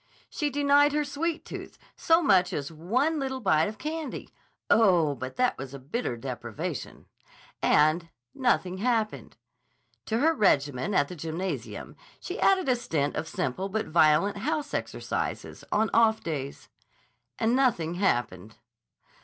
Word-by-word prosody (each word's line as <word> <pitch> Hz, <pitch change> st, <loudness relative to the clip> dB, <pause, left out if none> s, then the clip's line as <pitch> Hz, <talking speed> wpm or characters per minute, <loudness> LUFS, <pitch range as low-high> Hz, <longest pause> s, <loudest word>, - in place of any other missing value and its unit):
She 295 Hz, -, -1 dB
denied 285 Hz, +1 st, +4 dB
her 300 Hz, 0 st, +1 dB
sweet 320 Hz, +4 st, -3 dB
tooth -, -, -8 dB, 0.2 s
so 330 Hz, +1 st, +3 dB
much 190 Hz, -, +4 dB
as 145 Hz, -1 st, -3 dB
one 240 Hz, -, 0 dB
little 265 Hz, -1 st, -3 dB
bite 160 Hz, -8 st, +2 dB
of 215 Hz, +1 st, -6 dB
candy—oh, 225 Hz, -, 0 dB
but 130 Hz, 0 st, -7 dB
that 250 Hz, 0 st, +1 dB
was 135 Hz, 0 st, -7 dB
a -, -, -6 dB
bitter 140 Hz, -, -3 dB
deprivation—and 150 Hz, +4 st, -2 dB, 0.2 s
nothing 190 Hz, -7 st, 0 dB
happened. 225 Hz, -1 st, -1 dB, 0.7 s
To 220 Hz, -, 0 dB
her 315 Hz, +7 st, +3 dB
regimen 145 Hz, -, +1 dB
at 145 Hz, -, +3 dB
the 180 Hz, -, -8 dB
gymnasium 165 Hz, +4 st, -5 dB, 0.2 s
she 375 Hz, +6 st, -6 dB
added 380 Hz, -4 st, +3 dB
a 255 Hz, -, +4 dB
stint 150 Hz, -11 st, -2 dB
of 155 Hz, +2 st, -3 dB
simple 165 Hz, +5 st, -3 dB
but 215 Hz, -1 st, -2 dB
violent 160 Hz, +5 st, +4 dB
house 300 Hz, +6 st, -2 dB
exercises -, -, -4 dB
on 220 Hz, +1 st, +1 dB
off 225 Hz, -1 st, +4 dB
days—and 140 Hz, -, -5 dB
nothing 220 Hz, -12 st, +1 dB
happened. 120 Hz, -, -1 dB
195 Hz, 130 wpm, -27 LUFS, -, 0.7 s, denied